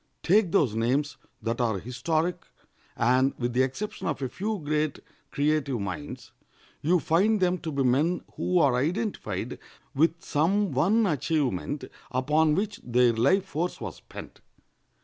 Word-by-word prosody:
Take 195 0 +3
those 150 - +3
names 130 +7 0 0.3
that 115 +2 -1
are 110 -4 +1
historic, 160 - -2 0.5
and, 130 +3 +3
with 120 -1 -2
the 125 - +3
exception 135 +11 -3
of 155 - -2
a 130 - -2
few 210 - -3
great 150 -2 -1 0.3
creative 145 -3 0
minds, 90 -7 -6 0.5
you 175 +4 +3
find 200 +8 +2
them 180 -1 +1
to 160 - -5
be 140 -2 0
men 145 +8 +2
who 180 - 0
are 140 -6 +4
identified 185 - -2 0.3
with 165 +4 +1
some 190 +6 +1
one 195 - +3
achievement 145 - -1 0.3
upon 150 +4 +2
which 205 +2 -2
their 120 0 +3
life 140 - +3
force 175 0 -3
was - - -6
spent. - - -11
150 Hz, 145 wpm, -27 LUFS, 125-180 Hz, 0.5 s, are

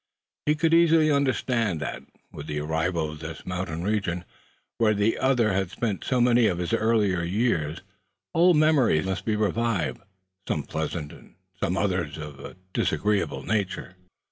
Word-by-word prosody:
He 150 - +4
could 160 +1 +1
easily 165 -2 +5
understand 125 - +1
that, 70 - -4 0.3
with 75 - -9
their 75 -1 -3
arrival 80 0 -1
in 75 - -10
this 80 0 -8
mountainous 90 -2 -3
region, 90 -5 -1 0.5
where 110 -2 +3
the 105 +2 +1
other 125 -6 +2
had 95 -1 0
spent 100 0 -3
many 120 -2 +4
of 90 - 0
his 90 +4 -2
earlier 110 -5 +2
years, 85 -5 0 0.5
old 170 0 +5
memories 140 - +3
must 95 0 -3
be 110 - +1
revived, 105 -4 0 0.5
some - - -1
pleasant, 80 -1 -4
and - - -16 0.2
possibly 90 +4 0
others 90 -7 -1
of 75 -3 -8
a - - -9 0.2
disagreeable 105 -1 0
nature. 95 -3 -2
100 Hz, 150 wpm, -26 LUFS, 85-120 Hz, 0.5 s, easily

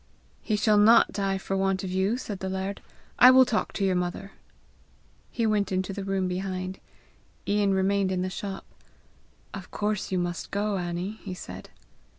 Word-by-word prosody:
"He 215 - -1
shall 210 0 +3
not 225 +3 +6
die 195 -1 -1
for 195 0 -3
want 195 0 0
of 185 - -4
you!" 190 +5 +1
said 205 -6 -6
the 190 - -3
laird. 190 +1 -4 0.4
"I 250 - +10
will 260 0 +7
talk 235 -3 -1
to 195 - -1
your 190 - +2
mother." 180 +2 -3 1.0
He 230 - -1
went 210 -2 +1
into 190 +1 -1
the 200 - -5
room 195 -1 -1
behind. 185 0 -4 0.7
Ian 200 -1 +2
remained 195 0 +1
in 180 -1 -1
the 185 - -2
shop. 195 0 -6 0.9
"Of 195 -3 -8
course 210 -1 -2
you 185 - +1
must 175 -1 -3
go, 205 0 -1
Annie!" 180 +4 -4
he 185 -3 -5
said. 95 - -9
195 Hz, 175 wpm, -27 LUFS, 185-205 Hz, 1.0 s, I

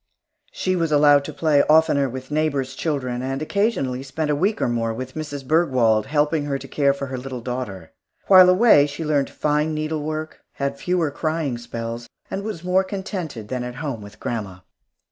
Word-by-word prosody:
She 185 - -1
was 165 -3 0
allowed 145 -1 +5
to - - -5
play 150 -1 +3
oftener 150 -3 +4
with 130 +2 -8
neighbors' 145 -4 0
children, 130 -5 -2
and 135 +1 -3
occasionally 155 - -1
spent 150 +3 -2
a - - +2
week 200 +8 0
or - - +1
more 115 -1 -1
with 130 +2 -6
Mrs. 145 -3 -6
Bergwald, 130 -9 +2
helping 150 0 +1
her 140 -1 -1
to - - -10
care 140 -2 +2
for 140 0 -4
her 130 -1 -5
little 130 -1 -6
daughter. 115 -9 -5 0.3
While 185 -2 +8
away, 185 -7 +6
she 155 +3 -6
learned 145 -3 +1
fine 150 +1 0
needlework, 155 0 -3
had 140 0 -3
fewer 175 -4 0
crying 155 -5 -2
spells, 115 0 -6 0.2
and 195 - -2
was 210 -6 -5
more 185 +1 +2
contented 185 - -5
than 125 -1 -2
at 125 0 -6
home 135 -5 -4
with 100 0 -12
grandma. 100 -6 -4
145 Hz, 185 wpm, -22 LUFS, 130-160 Hz, 0.3 s, While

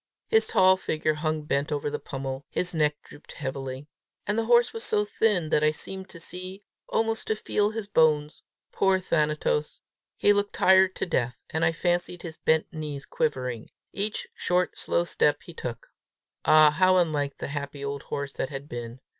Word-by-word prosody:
His 445 0 +4
tall 185 0 +5
figure 155 -3 -1
hung 155 0 -2
bent 145 0 -1
over 145 -1 -1
the 150 - -3
pommel, 135 0 -5
his 180 0 -1
neck 150 -2 +2
drooped 145 - -14
heavily. 135 -1 -5 0.4
And 205 - 0
the 225 0 0
horse 240 +1 +4
was 225 - -4
so 210 0 +2
thin 205 -6 +1
that 150 - +2
I 155 - +5
seemed 190 +5 -5
to 170 - -11
see, 185 +4 -6 0.3
almost 225 0 0
to 220 - +1
feel 210 -1 0
his 220 -1 -5
bones. 155 -5 +2 0.3
Poor 190 -1 +2
Thanatos! 150 -3 0 0.4
he 205 - +5
looked 205 0 0
tired 190 0 +5
to - - -2
death, 125 -9 -2
and 160 - -1
I - - +4
fancied 175 +1 -1
his 160 -2 -7
bent 160 +2 +1
knees 150 -3 -5
quivering, 125 -6 -2 0.2
each 205 +2 -3
short 180 0 0
slow 170 - +1
step 150 -3 +1
he 170 - -11
took. 120 -7 -6 0.6
Ah, 155 -1 +7
how 185 +4 +4
unlike 150 -5 0
the - - -5
happy 140 -1 -5
old 140 0 -4
horse 140 -1 -5
that - - -3
had 140 0 -7
been! 120 -1 -7
155 Hz, 180 wpm, -26 LUFS, 145-190 Hz, 0.6 s, Ah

